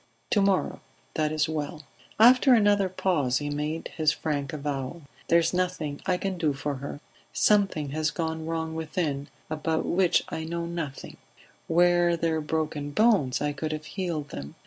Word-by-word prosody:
To 205 Hz, -, +4 dB
morrow; 195 Hz, -1 st, +1 dB, 0.3 s
that 155 Hz, -1 st, 0 dB
is 155 Hz, 0 st, +1 dB
well." 155 Hz, 0 st, -4 dB, 0.4 s
After 250 Hz, +3 st, +7 dB
another 205 Hz, -3 st, +3 dB
pause 155 Hz, -9 st, +1 dB
he 145 Hz, +2 st, -3 dB
made 150 Hz, +2 st, -3 dB
his 155 Hz, -2 st, +3 dB
frank 145 Hz, -4 st, -2 dB
avowal. 145 Hz, +1 st, -4 dB, 0.2 s
"There 170 Hz, -, +5 dB
is 170 Hz, +1 st, +2 dB
nothing 180 Hz, -5 st, -2 dB
I 180 Hz, -1 st, +2 dB
can 190 Hz, -1 st, -3 dB
do 155 Hz, -4 st, +1 dB
for 140 Hz, 0 st, -3 dB
her. 140 Hz, +2 st, -6 dB, 0.3 s
Something 195 Hz, -8 st, +2 dB
has 155 Hz, +1 st, 0 dB
gone 160 Hz, 0 st, -3 dB
wrong 160 Hz, -1 st, -2 dB
within, 155 Hz, -3 st, -2 dB, 0.2 s
about 160 Hz, +1 st, -1 dB
which 180 Hz, 0 st, +3 dB
I 160 Hz, -, -4 dB
know 170 Hz, +1 st, -3 dB
nothing; 165 Hz, -5 st, -6 dB, 0.5 s
were 175 Hz, 0 st, +4 dB
there 160 Hz, -1 st, 0 dB
broken 150 Hz, -1 st, -2 dB
bones 170 Hz, -, +3 dB
I 145 Hz, 0 st, 0 dB
could 155 Hz, +2 st, -3 dB
have 155 Hz, 0 st, -5 dB
healed 165 Hz, -5 st, -3 dB
them. 70 Hz, -, -8 dB
160 Hz, 165 wpm, -27 LUFS, 150-175 Hz, 0.5 s, After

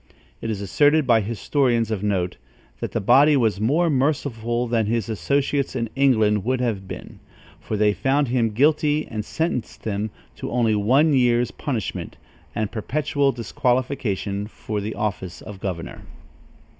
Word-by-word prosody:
It 115 Hz, -, -3 dB
is 105 Hz, -3 st, -3 dB
asserted 145 Hz, -, +3 dB
by 115 Hz, -3 st, +4 dB
historians 115 Hz, +1 st, 0 dB
of 105 Hz, -4 st, -1 dB
note, 95 Hz, -4 st, -1 dB, 0.4 s
that -, -, -4 dB
that -, -, 0 dB
body 140 Hz, +8 st, +5 dB
was 110 Hz, -6 st, +1 dB
more 150 Hz, +10 st, +2 dB
merciful 130 Hz, -5 st, 0 dB
than 115 Hz, -2 st, +1 dB
his 115 Hz, -1 st, -1 dB
associates 140 Hz, +5 st, 0 dB
in 115 Hz, -3 st, -2 dB
England 110 Hz, -7 st, +3 dB
would 130 Hz, +2 st, 0 dB
have 110 Hz, -6 st, -2 dB
been, -, -, -9 dB, 0.4 s
for 105 Hz, -, -4 dB
they 105 Hz, 0 st, +3 dB
found 135 Hz, +3 st, +1 dB
him 120 Hz, -2 st, +2 dB
guilty 150 Hz, +5 st, +2 dB
and 110 Hz, -2 st, -4 dB
sentenced 160 Hz, -1 st, -3 dB
him 105 Hz, 0 st, -2 dB, 0.3 s
to -, -, -5 dB
only 120 Hz, -2 st, +2 dB
one 130 Hz, +10 st, +3 dB
year's 120 Hz, -2 st, +3 dB
punishment 125 Hz, -8 st, -4 dB, 0.4 s
and 110 Hz, -2 st, -1 dB
perpetual 140 Hz, +4 st, 0 dB
disqualification 120 Hz, -5 st, -1 dB
for 105 Hz, -1 st, -5 dB
the 105 Hz, +2 st, -4 dB
office 95 Hz, -4 st, -3 dB
of 105 Hz, -3 st, -10 dB
governor. 90 Hz, -4 st, -5 dB
115 Hz, 150 wpm, -23 LUFS, 105-140 Hz, 0.4 s, body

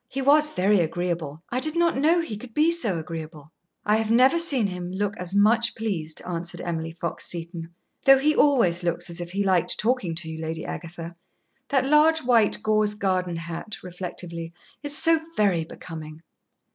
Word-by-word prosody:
He 270 Hz, +2 st, -5 dB
was 300 Hz, +2 st, +5 dB
very 200 Hz, -4 st, +2 dB
agreeable. 165 Hz, -2 st, -2 dB
I 250 Hz, -, 0 dB
did 310 Hz, +4 st, 0 dB
not 340 Hz, 0 st, +2 dB
know 320 Hz, +6 st, +3 dB
he 325 Hz, -10 st, -5 dB
could 225 Hz, +2 st, -11 dB
be 310 Hz, +2 st, +4 dB
so 230 Hz, -, +1 dB
agreeable." 155 Hz, -2 st, -7 dB, 0.4 s
"I 210 Hz, +1 st, +3 dB
have 220 Hz, -1 st, -2 dB
never 255 Hz, +8 st, +5 dB
seen 280 Hz, -9 st, +3 dB
him 180 Hz, -2 st, -4 dB
look 205 Hz, +2 st, -2 dB
as 180 Hz, +1 st, -4 dB
much 225 Hz, +3 st, +4 dB
pleased," 180 Hz, -9 st, -3 dB
answered 175 Hz, -1 st, -4 dB
Emily 165 Hz, -1 st, -3 dB
Fox 170 Hz, 0 st, -5 dB
Seton. 170 Hz, -1 st, -5 dB, 0.4 s
"Though 270 Hz, -1 st, +8 dB
he 300 Hz, +3 st, +2 dB
always 230 Hz, -12 st, +3 dB
looks 175 Hz, 0 st, -2 dB
as 170 Hz, -, -5 dB
if 175 Hz, -, -6 dB
he 200 Hz, +3 st, -1 dB
liked 185 Hz, -3 st, +2 dB
talking 215 Hz, -7 st, 0 dB
to 165 Hz, 0 st, -2 dB
you, 160 Hz, 0 st, -6 dB
Lady 160 Hz, 0 st, -4 dB
Agatha. 170 Hz, 0 st, -7 dB, 0.6 s
That 270 Hz, -2 st, +2 dB
large 305 Hz, +3 st, +4 dB
white 230 Hz, -4 st, +2 dB
gauze 215 Hz, -1 st, +2 dB
garden 185 Hz, -3 st, -1 dB
hat" 170 Hz, +5 st, -6 dB
reflectively 175 Hz, -2 st, -6 dB, 0.3 s
"is 290 Hz, 0 st, -1 dB
so 330 Hz, -1 st, +4 dB, 0.2 s
very 185 Hz, -6 st, +2 dB
becoming." 160 Hz, -1 st, -9 dB
190 Hz, 180 wpm, -25 LUFS, 170-255 Hz, 0.6 s, Though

